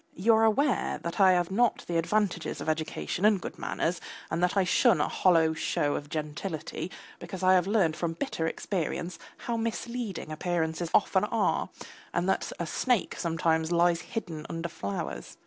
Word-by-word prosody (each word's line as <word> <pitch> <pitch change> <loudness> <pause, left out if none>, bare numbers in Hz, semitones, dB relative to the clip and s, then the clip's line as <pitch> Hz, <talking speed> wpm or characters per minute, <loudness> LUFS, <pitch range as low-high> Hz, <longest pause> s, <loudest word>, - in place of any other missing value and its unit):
You 220 +6 +4
are 225 0 +5
aware 260 +5 +2
that 170 +3 -4
I 190 -2 +7
have 175 0 +1
not 235 +3 +2
the 170 -1 +1
advantages 190 -1 0
of - - -6
education 155 +3 -2
and 210 -2 +5
good - - -7
manners, 170 +1 -1 0.3
and 170 - -1
that 180 +2 +1
I 195 - +5
shun 230 +6 +4
a - - +2
hollow 165 -3 +3
show 145 -2 0
of 145 - -4
gentility 155 +3 -4 0.3
because 190 -1 -7
I 185 0 +6
have 180 0 +3
learned 195 -7 +2
from 165 0 -2
bitter 165 -4 -2
experience 175 -1 -3 0.2
how 235 -1 -3
misleading 230 -5 -3
appearances 165 0 -1
often - - +3
are, - - 0 0.5
and 175 +2 +1
that 190 - 0
a 170 - -1
snake 245 +7 0
sometimes 165 -1 0
lies 170 -1 +3
hidden 165 -8 -5
under 165 0 -3
flowers. 100 - -5
175 Hz, 170 wpm, -28 LUFS, 160-200 Hz, 0.5 s, I